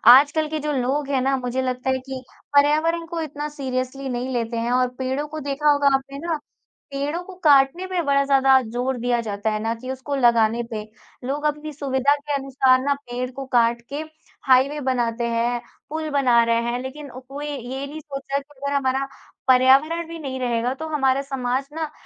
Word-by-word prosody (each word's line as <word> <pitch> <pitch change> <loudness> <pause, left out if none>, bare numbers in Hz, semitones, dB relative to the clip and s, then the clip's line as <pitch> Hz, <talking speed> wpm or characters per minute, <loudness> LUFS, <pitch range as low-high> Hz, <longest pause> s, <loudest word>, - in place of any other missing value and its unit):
आजकल 295 +3 +4
के 310 0 -2
जो 300 0 -2
लोग 275 +3 -1
हैं 265 -2 +1
ना 270 +1 +2
मुझे 250 +1 -2
लगता 255 0 -2
है 260 - +1
कि 265 -1 -6 0.3
पर्यावरण 310 +4 +3
को 335 -1 -3
इतना 295 -1 -4
सीरियसली 265 -1 -3
नहीं 250 +1 -3
लेते 235 -1 -2
हैं 235 +1 -1
और 250 0 +3
पेड़ों 265 +3 -2
को 310 +1 -6
देखा 285 +1 0
होगा 285 -1 +4
आपने 275 +1 -4
ना, 325 -2 0 0.6
पेड़ों 290 +5 -2
को 375 0 -11
काटने 285 +4 +5
पे 370 -2 -1
बड़ा 280 -1 +3
ज़्यादा 270 -1 +5
जोर 245 +2 -2
दिया 240 0 +1
जाता 210 -1 -2
है 215 - -1
ना 225 +1 0
कि 255 +3 -6
उसको 265 +2 -4
लगाने 235 -3 +3
पे। 215 -1 -3 0.4
लोग 290 +3 -2
अपनी 300 +1 -1
सुविधा 275 0 +1
के 290 0 -5
अनुसार 265 -2 +3
ना 285 +2 +2
पेड़ 250 -2 -5
को 270 +1 -7
काट 235 0 +3
के 285 +2 -3 0.5
हाईवे 265 +3 +4
बनाते 240 -3 0
हैं, 235 +1 0 0.3
पूल 315 +1 -3
बना 255 -5 +4
रहे 230 0 +2
हैं 245 - -2
लेकिन 280 +3 -7 0.2
कोई 290 +2 -5
ये 270 0 -5
नहीं 300 +2 -7
सोच 275 -2 -7
रहा 280 - +2
कि 280 0 -18
अगर 280 0 -1
हमारा 270 0 +1 0.4
पर्यावरण 275 +6 +4
भी 335 0 -7
नहीं 265 -3 -5
रहेगा 245 0 0
तो 320 +3 -6
हमारा 270 -3 +2
समाज 270 -1 -2
ना 315 -1 -3
270 Hz, 200 wpm, -23 LUFS, 250-290 Hz, 0.6 s, काटने